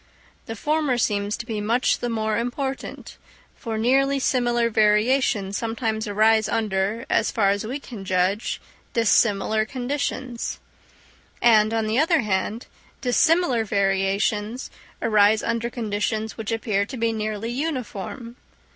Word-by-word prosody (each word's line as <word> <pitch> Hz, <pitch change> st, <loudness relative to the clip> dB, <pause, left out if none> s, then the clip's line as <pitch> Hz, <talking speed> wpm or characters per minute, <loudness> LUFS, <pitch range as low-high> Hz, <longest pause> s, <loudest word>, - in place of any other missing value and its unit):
The 225 Hz, -, -5 dB
former 295 Hz, +1 st, 0 dB
seems 205 Hz, -2 st, 0 dB
to 235 Hz, -, -6 dB
be 220 Hz, -3 st, -3 dB
much 230 Hz, +4 st, +1 dB
the 240 Hz, -, -2 dB
more 220 Hz, -1 st, -1 dB
important; 265 Hz, +3 st, -4 dB, 0.4 s
for 225 Hz, -3 st, -5 dB
nearly 270 Hz, +5 st, +2 dB
similar 240 Hz, -3 st, +1 dB
variations 210 Hz, -1 st, +2 dB
sometimes 225 Hz, -1 st, -2 dB
arise 215 Hz, +1 st, +3 dB
under, 215 Hz, +1 st, -1 dB
as 225 Hz, -, +2 dB
far 200 Hz, -3 st, +2 dB
as 205 Hz, +2 st, -2 dB
we 265 Hz, +5 st, -4 dB
can 230 Hz, -7 st, -9 dB
judge, 190 Hz, +3 st, 0 dB, 0.3 s
dissimilar 215 Hz, -1 st, +2 dB
conditions; 255 Hz, 0 st, -3 dB, 0.8 s
and, 220 Hz, -2 st, +5 dB
on 225 Hz, -1 st, 0 dB
the 220 Hz, +4 st, +1 dB
other 325 Hz, +1 st, +3 dB
hand, 210 Hz, +2 st, -2 dB, 0.4 s
dissimilar 270 Hz, -1 st, +3 dB
variations 200 Hz, +3 st, 0 dB, 0.3 s
arise 215 Hz, -1 st, +4 dB
under 230 Hz, 0 st, -1 dB
conditions 220 Hz, -1 st, -2 dB
which 225 Hz, 0 st, -5 dB
appear 220 Hz, -3 st, 0 dB
to 240 Hz, +5 st, -7 dB
be 230 Hz, -1 st, 0 dB
nearly 215 Hz, +1 st, -3 dB
uniform. 250 Hz, -, -4 dB
225 Hz, 130 wpm, -23 LUFS, 210-245 Hz, 0.8 s, and